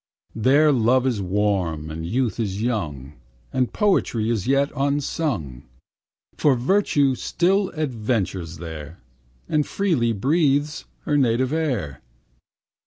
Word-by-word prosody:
There 140 +7 +4
love 125 0 +3
is 120 -6 0
warm, 90 -5 -1
and 80 +1 -5
youth 120 +3 -1
is 100 -3 -2
young, 75 - -3 0.4
And 130 -1 +1
poetry 120 - +1
is 110 -1 -2
yet 140 +1 +2
unsung. 135 - -1 0.8
For 145 -3 +3
Virtue 140 0 +2
still 190 +9 +1
adventures 105 - -2
there, 80 -1 -8 0.5
And 150 -1 +2
freely 155 -11 0
breathes 145 - +1 0.2
her 150 - 0
native 130 +1 +2
air. 125 - -2
125 Hz, 110 wpm, -23 LUFS, 95-145 Hz, 0.8 s, There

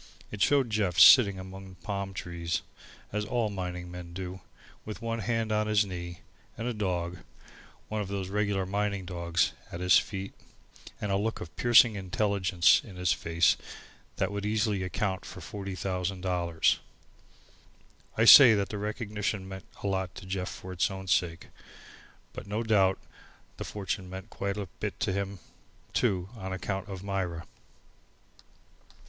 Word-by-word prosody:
It 105 - -6
showed 135 -5 +3
Jeff 100 -5 0
sitting 100 -7 +8
among 95 0 -9
palm 100 0 -4
trees, 85 -1 -3 0.5
as 105 0 0
all 110 0 -1
mining 90 -2 -5
men 90 -1 -8
do, 95 +1 -6 0.4
with 110 +1 -7
one 115 -1 -3
hand 115 +1 -1
on 105 0 +1
his 105 -1 +3
knee, 85 -2 -7 0.4
and 115 +1 -3
a 125 - -1
dog, 90 -4 -2 0.7
one 110 0 -2
of 100 - -4
those 100 -1 -3
regular 100 -1 0
mining 100 0 -1
dogs, 85 -1 0 0.2
at 85 - -6
his 90 0 +6
feet, 95 -2 -6 0.7
and 105 - -2
a 95 - +2
look 110 +3 -1
of 80 - -9
piercing 120 -1 +6
intelligence 95 -2 +3
in 100 -5 -12
his 90 0 +2
face 85 0 +2 0.6
that - - -1
would 100 0 -4
easily 105 -1 0
account 95 +1 -2
for - - -9
forty 100 -2 -6
thousand 90 0 -2
dollars. 85 -3 +1 1.4
I 110 - +4
say 120 -2 +11
that 100 -1 -1
the 105 - -4
recognition 105 -2 -3
meant 95 0 -8 0.2
a - - 0
lot 95 -2 -2
to - - -9
Jeff 95 -1 -3
for 95 0 -8
its 90 - +1
own 95 -1 -7
sake. 85 0 0 0.8
But - - -8
no 105 +3 -2
doubt 95 -4 +3 0.6
the - - -4
fortune 95 -2 -4
meant 95 0 -8
quite 100 +1 -3
a 100 - -3
bit - - -4
to 95 - +1
him 100 0 -3 0.6
too 95 -1 +1
on 95 -3 -6
account 95 +2 -4
of 95 -1 -6
Myra. 95 -4 -3
95 Hz, 160 wpm, -29 LUFS, 90-105 Hz, 1.4 s, say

